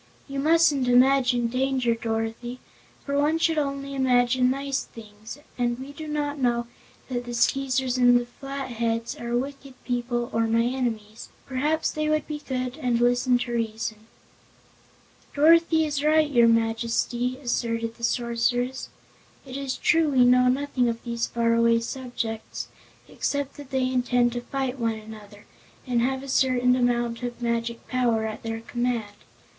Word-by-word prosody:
"You 275 -1 -4
mustn't 305 -3 +3
imagine 250 -1 +4
danger, 255 0 +1
Dorothy, 225 +1 -3 0.5
for 280 0 0
one 305 +2 +2
should 325 -1 +2
only 275 -1 -3
imagine 250 -1 +3
nice 275 +1 -1
things, 215 +1 -11 0.2
and 240 -1 0
we 265 +2 -8
do 310 +2 -8
not 295 -1 -2
know 240 -2 +1 0.4
that 245 -2 -3
the 240 0 -5
Skeezers 260 +1 +1
and 245 -1 +5
Flatheads 235 -4 -3
are 235 0 -1
wicked 275 +1 -6
people 240 -1 -2
or 225 0 +1
my 230 +1 +2
enemies. 230 -4 -3 0.2
Perhaps 295 +4 0
they 305 0 -1
would 305 -1 +1
be 300 -1 -4
good 255 -2 -4
and 245 -2 +1
listen 245 +1 +3
to 245 0 -4
reason." 225 -1 -3 1.3
"Dorothy 320 +1 +5
is 290 -2 -2
right, 305 0 +3
your 235 -3 +5
Majesty," 230 +2 0
asserted 230 -3 -2
the 235 - -14
Sorceress. 245 +2 0 0.6
"It 260 -1 -9
is 275 -1 -3
true 330 -3 +3
we 255 -3 +4
know 250 0 +5
nothing 255 -1 +1
of 230 0 -4
these 235 -1 -2
faraway 230 0 +2
subjects, 230 -2 -5 0.4
except 285 -1 -3
that 285 -2 -10
they 265 -1 0
intend 245 -1 +2
to 240 - -3
fight 265 +1 -3
one 230 -1 0
another, 215 -1 -12 0.4
and 245 -3 +1
have 265 +2 -1
a - - -8
certain 250 -1 +3
amount 240 -1 0
of 240 -1 -5
magic 235 -1 -2
power 235 -3 +1
at 215 -1 -5
their 225 0 -4
command. 240 -3 -2
245 Hz, 150 wpm, -25 LUFS, 235-270 Hz, 1.3 s, and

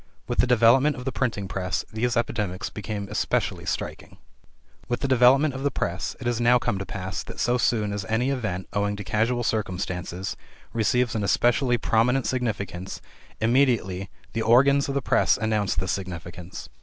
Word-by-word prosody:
With 120 - -3
the 125 - +4
development 125 +5 +5
of 125 - -8
the 135 - -1
printing 110 -8 -2
press, 90 -1 -2
these 120 +2 0
epidemics 105 -6 -2
became 105 -1 -5
especially - - -1
striking. - - -4 0.7
With 120 0 -2
the 140 - 0
development 135 +3 +5
of 135 - -5
the 145 - +1
press, 90 -8 -3
it 130 - -8
has 120 -1 0
now 120 +1 +5
come 120 -5 -1
to 100 - -5
pass 95 -2 -4
that - - -9
so 125 +1 +2
soon 105 -3 +1
as 100 -1 -3
any 120 +6 0
event, 105 -9 -3
owing 100 +1 0
to 105 - -6
casual 110 +6 0
circumstances, 90 -4 -3 0.4
receives 115 +1 +1
an 110 - -1
especially 120 +4 +2
prominent 120 +3 +2
significance, 105 -6 -3 0.4
immediately 115 -6 +1 0.2
the 115 - -1
organs 140 +5 +4
of 140 - -2
the 140 - 0
press - - +3
announce 110 -3 0
this 95 +3 -1
significance. 90 -1 -6
115 Hz, 170 wpm, -25 LUFS, 100-125 Hz, 0.7 s, development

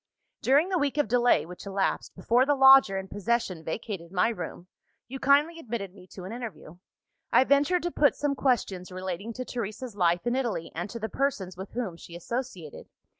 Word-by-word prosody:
"During 290 +7 +3
the 370 -2 +1
week 285 0 -1
of 295 - +2
delay 245 -2 +3
which 180 +3 -10
elapsed, 195 0 -1
before 235 +7 +3
the 290 +2 +2
lodger 265 -7 +7
in 190 0 -5
possession 205 -4 -1
vacated 170 -1 -5
my 185 +3 +2
room, 180 -4 -6 0.4
you 270 +2 -7
kindly 290 +5 +3
admitted 225 - -5
me 185 -2 -15
to 185 - -10
an 185 - -7
interview. 225 -9 -8 0.5
I - - +6
ventured 285 +6 +2
to 350 - -1
put 290 -3 +3
some 290 -1 0
questions, 220 -9 -1
relating 185 +3 -5
to 255 +2 -5
Teresa's 230 0 -5
life 175 -1 +1
in 240 +1 +1
Italy 230 -11 -2
and 175 +4 -4
to 235 - -6
the 220 -1 -3
persons 220 -9 -2
with 190 +2 -9
whom 220 -9 -3
she 170 - -12
associated. 185 - -6
225 Hz, 190 wpm, -27 LUFS, 185-265 Hz, 0.5 s, lodger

